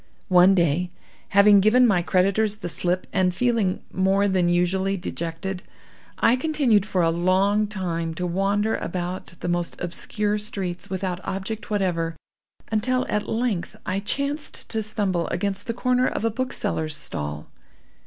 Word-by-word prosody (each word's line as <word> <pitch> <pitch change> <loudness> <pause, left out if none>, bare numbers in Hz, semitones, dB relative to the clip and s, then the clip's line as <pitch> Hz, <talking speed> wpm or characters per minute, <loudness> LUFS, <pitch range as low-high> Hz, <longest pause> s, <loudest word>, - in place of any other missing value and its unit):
"One 185 +1 +6
day, 170 0 +1 0.4
having 200 +1 +7
given 225 +6 +5
my 195 -7 +3
creditors 195 +4 +2
the 210 -5 -5
slip, 180 +2 -1
and 185 -2 +2
feeling 230 -5 +1
more 195 +2 +2
than 185 -3 +2
usually 190 +3 +1
dejected, 175 +1 -4 0.6
I 235 - +4
continued 255 -9 +2
for 185 -4 +1
a 165 - +3
long 190 +5 +2
time 170 -5 -3
to 180 - -3
wander 200 +4 +1
about 180 +1 -5
the - - -3
most 175 0 -2
obscure 210 +4 -2
streets 195 -5 -4
without 185 -1 -3
object 195 +3 -4
whatever, 175 -5 0 0.6
until 250 +4 +1
at 210 - -1
length 225 -6 -1
I 185 +1 -1
chanced 280 +8 -3
to 220 - 0
stumble 205 -5 -1
against 200 +4 -2
the 230 - -1
corner 250 +1 +2
of - - -2
a 230 - +2
bookseller's 185 - -2
stall. 75 - -5
195 Hz, 145 wpm, -24 LUFS, 175-215 Hz, 0.6 s, having